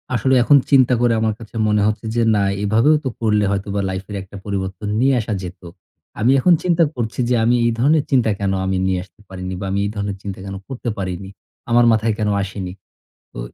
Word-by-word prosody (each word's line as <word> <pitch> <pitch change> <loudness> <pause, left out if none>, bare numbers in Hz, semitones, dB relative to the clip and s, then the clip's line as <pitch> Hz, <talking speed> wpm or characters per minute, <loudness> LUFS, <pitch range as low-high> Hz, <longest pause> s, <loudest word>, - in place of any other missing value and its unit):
আসলে 130 +4 +2
এখন 145 +3 +6
চিন্তা 130 -3 +5
করে 120 -1 +3
আমার 110 -1 +1
কাছে 115 0 -13
মনে 105 -1 +2
হচ্ছে 110 +1 -2
যে, 120 - +2
"না, 100 - +2 0.2
এভাবেও 115 +9 +3
তো 130 - -1
করলে 105 -2 +2
হয়তোবা 100 0 -2
লাইফের 95 +2 -5
একটা 100 +1 -15
পরিবর্তন 95 0 -4
নিয়ে 135 +2 +3
আসা 110 0 -4
যেতো।" 90 0 -9 0.5
আমি 120 +5 +3
এখন 175 +7 +5
চিন্তা 170 -2 +3
করছি, 115 0 -4
যে 125 - +3
আমি 120 +2 +3
এই 120 - +3
ধরনের 145 +3 +3
চিন্তা 120 -5 +3
কেনো 95 -1 0
আমি 95 0 0
নিয়ে 95 -1 0
আসতে 95 +2 -22
পারিনি? 95 0 -6
বা - - -5
আমি 100 - 0
এই - - -1
ধরনের 100 -1 -3
চিন্তা 100 -2 -6
কেনো 95 0 -6
করতে 125 -2 -5
পারিনি? 95 0 -5 0.4
আমার 120 0 +5
মাথায় 110 0 +1
কেনো 105 -2 0
আসেনি? 95 -2 -5 0.6
তো - - -9
105 Hz, 210 wpm, -19 LUFS, 95-120 Hz, 0.6 s, এখন